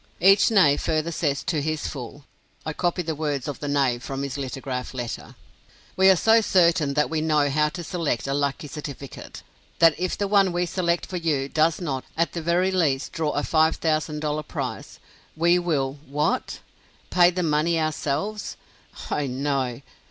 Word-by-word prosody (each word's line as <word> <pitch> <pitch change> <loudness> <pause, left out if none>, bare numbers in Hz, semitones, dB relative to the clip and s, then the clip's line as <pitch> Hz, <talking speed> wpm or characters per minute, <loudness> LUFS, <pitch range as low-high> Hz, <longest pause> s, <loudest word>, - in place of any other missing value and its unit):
Each 195 +3 +6
knave 185 -10 +4
further 160 +1 0
says 145 -4 -1
to 155 -5 -1
his 155 +1 -2
fool 140 +1 -7 0.4
(I 155 - -3
copy 175 +2 -1
the 160 -1 -2
words 145 -4 -2
of 145 - -5
the 145 - -4
knave 135 -4 +1
from 135 +2 -4
his 140 -2 -4
lithograph 130 -2 -5
letter:) 120 -2 -6 0.6
"We 190 0 +5
are 190 - +7
so 225 +5 +4
certain 170 -8 +3
that 150 - +2
we 160 -1 0
know 150 -2 +2
how 150 +1 +2
to 175 +2 -7
select 160 -9 -2
a 135 - -1
lucky 140 +1 -1
certificate, 140 -2 -8 0.3
that 165 -1 +6
if 185 0 -1
the 200 - -1
one 195 -2 +4
we 175 0 0
select 170 0 -1
for 185 - -5
you 150 -5 0
does 155 +2 +1
not, 140 -7 -3
at 170 +1 +1
the 170 - -3
very 175 +3 +1
least, 155 -7 0
draw 155 -2 -1
a 145 - -1
$5,000 155 -1 0
prize, - - -5 0.4
we 170 +2 +4
will" 145 -5 -1
what? 150 +2 -1 0.5
Pay 175 -1 +6
the 180 0 -2
money 160 +1 +1
ourselves? 155 +6 -2 0.5
Oh 145 -1 0
no. 135 -1 -2
155 Hz, 175 wpm, -24 LUFS, 140-170 Hz, 0.6 s, are